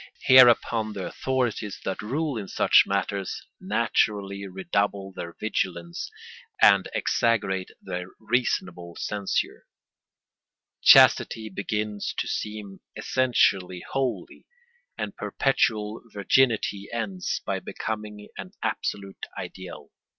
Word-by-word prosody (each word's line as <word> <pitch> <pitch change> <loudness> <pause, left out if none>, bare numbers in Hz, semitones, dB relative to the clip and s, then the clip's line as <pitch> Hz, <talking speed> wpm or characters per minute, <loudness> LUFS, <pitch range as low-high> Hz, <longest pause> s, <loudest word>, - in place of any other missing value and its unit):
Hereupon 120 -4 +6
the 95 -3 -5
authorities 125 -6 -2
that 95 - -3
rule 140 +6 -2
in 105 -3 -5
such - - +5
matters 100 -1 -2
naturally 100 -1 0
redouble 95 +1 -2
their 85 -2 -7
vigilance 85 -5 -3 0.5
and 100 -1 +6
exaggerate 100 -5 +1
their 90 0 -5
reasonable 90 -7 -1
censure: 100 -2 -2 1.1
chastity 110 -1 +6
begins 105 +1 -3
to - - -1
seem 105 -2 -5 0.2
essentially 95 -8 +1
holy 135 -2 -3 0.5
and - - -4
perpetual 110 -5 0
virginity 105 -1 +1
ends 105 -6 -3
by - - -1
becoming 105 -1 -6
an - - -8
absolute 100 -1 -3
ideal. - - -8
105 Hz, 95 wpm, -26 LUFS, 95-115 Hz, 1.1 s, Hereupon